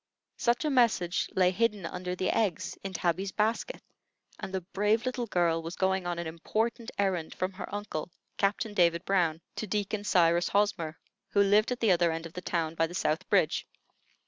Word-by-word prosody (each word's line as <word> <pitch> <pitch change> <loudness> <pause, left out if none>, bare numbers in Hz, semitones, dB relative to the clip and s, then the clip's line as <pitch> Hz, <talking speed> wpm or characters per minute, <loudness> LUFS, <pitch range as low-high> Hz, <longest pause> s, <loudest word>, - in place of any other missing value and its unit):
Such 240 +4 +1
a 300 - +1
message 225 -9 +2
lay 185 -1 +4
hidden 210 -1 0
under 180 +1 -4
the 185 0 0
eggs 210 -7 0
in 195 - -4
Tabby's 180 +2 -1
basket, 220 - -1 0.6
and - - -6
the 190 -1 -2
brave 210 +5 0
little 250 -2 -2
girl 170 -4 +1
was 165 +2 -6
going 190 -1 0
on 175 -1 -2
an 170 - -3
important 220 +8 -2
errand 185 -5 -1
from 185 +1 -1
her 185 - -7
uncle, 205 -6 -4 0.3
Captain 205 +2 0
David 170 -1 +3
Brown, 170 -5 +1 0.2
to 215 - -3
Deacon 205 +1 -2
Cyrus 175 -3 +3
Hosmer, 195 -6 0 0.3
who 200 - +4
lived 210 +4 +4
at 250 - -3
the 220 -4 +4
other 170 -1 +3
end 165 +1 -4
of 165 - -9
the 180 - -6
town, 165 -3 -1
by 165 0 +1
the 175 - -9
South 155 -3 -1
Bridge. - - +2
190 Hz, 190 wpm, -29 LUFS, 170-210 Hz, 0.6 s, lay